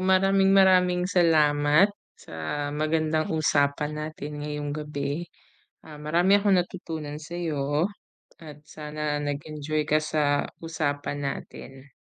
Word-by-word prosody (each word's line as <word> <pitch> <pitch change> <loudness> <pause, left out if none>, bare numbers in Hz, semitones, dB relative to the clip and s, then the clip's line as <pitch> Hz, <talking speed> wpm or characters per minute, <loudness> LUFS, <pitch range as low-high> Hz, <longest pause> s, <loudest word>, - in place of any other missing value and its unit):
maraming-maraming 190 -1 +4
salamat 160 0 +4 0.2
sa - - -15 0.4
magandang 155 +1 0
usapan 145 -1 +1
natin 150 -1 -6
ngayong 150 -1 -4
gabi. 150 +2 -4 0.6
Ah, 150 -1 -11
marami 170 +5 +2
akong 200 -2 +3
natutunan 160 -4 -4
sa'yo 155 -2 -2 0.5
at 150 -3 -12
sana 150 -1 -4
nag-enjoy 150 +1 -3
ka 155 - +4
sa 150 -2 0 0.2
usapan 145 -3 -2
natin. 135 0 -7
155 Hz, 100 wpm, -26 LUFS, 145-170 Hz, 0.6 s, maraming-maraming